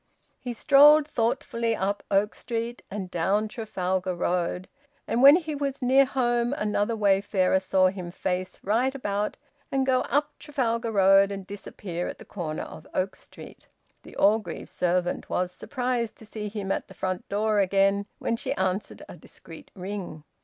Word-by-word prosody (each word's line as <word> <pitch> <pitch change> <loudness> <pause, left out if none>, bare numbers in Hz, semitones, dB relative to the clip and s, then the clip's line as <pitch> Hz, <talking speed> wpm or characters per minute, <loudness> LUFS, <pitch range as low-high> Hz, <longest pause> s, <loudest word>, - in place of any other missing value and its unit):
He 245 - -5
strolled 295 +5 +6
thoughtfully 235 -3 -1
up 200 +1 -1
Oak 200 +2 +2
Street, 235 0 -4
and 190 -2 -5
down 195 +5 +1
Trafalgar 190 -4 -2
Road; 180 +1 -1 0.4
and 235 - 0
when 280 +3 +10
he 320 -3 -2
was 280 -1 -3
near 265 +2 +5
home, 240 -1 0
another 210 -2 0
wayfarer 195 -2 +2
saw 185 0 +3
him 185 -2 -6
face 185 0 -3
right 245 +7 +1
about 205 -5 -2 0.3
and 270 -1 +1
go 255 -1 +3
up 290 +3 +1
Trafalgar 235 -5 -1
Road 195 -1 +5
and 195 -1 -6
disappear 190 -3 -6
at - - -6
the - - -13
corner 160 -6 -4
of 155 - -11
Oak 190 +1 -1
Street. - - -13 0.3
The - - -14
Orgreave 210 +2 +1
servant 180 0 -1
was 180 0 -1
surprised 245 +1 -3
to 220 - -13
see 210 -1 -6
him 200 -2 -4
at - - -2
the - - -14
front 185 -1 -3
door 210 +1 +1
again 195 +1 +2
when 230 - -1
she - - -2
answered 190 +2 -2
a - - -10
discreet - - -13
ring. 185 -5 -6
205 Hz, 160 wpm, -26 LUFS, 190-240 Hz, 0.4 s, when